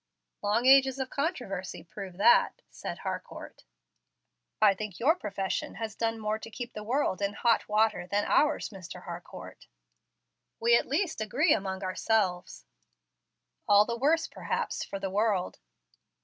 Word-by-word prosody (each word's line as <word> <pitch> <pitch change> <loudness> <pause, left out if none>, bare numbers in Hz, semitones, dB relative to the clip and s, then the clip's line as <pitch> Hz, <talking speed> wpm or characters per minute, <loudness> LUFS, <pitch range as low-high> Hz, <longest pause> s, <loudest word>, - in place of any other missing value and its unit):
"Long 210 +4 +1
ages 265 0 +6
of 265 -1 -4
controversy 245 - -3
prove 185 +1 -9
that," 320 - +4
said - - -6
Harcourt. - - -7 0.9
"I 210 -2 +6
think 200 -1 -7
your 280 +7 +4
profession 195 - -3
has 225 -2 -5
done 225 +1 -1
more 215 0 -2
to 225 - -9
keep 240 +2 -7
the 210 - -6
world 235 -4 0
in 200 0 0
hot 230 +1 +1
water 215 -3 +2
than 205 +3 0
ours, 300 - +2
Mr. 185 -3 -10
Harcourt." 175 -1 -9 0.9
"We 235 +1 +5
at - - +2
least 315 - -1
agree 250 +10 +3
among 190 -1 -3
ourselves." 185 - -1 1.0
"All 205 0 +6
the 235 - -2
worse, 315 +7 +2
perhaps, - - -3
for 195 - -6
the 195 -1 -4
world." 205 -2 0
215 Hz, 145 wpm, -29 LUFS, 195-250 Hz, 1.0 s, ages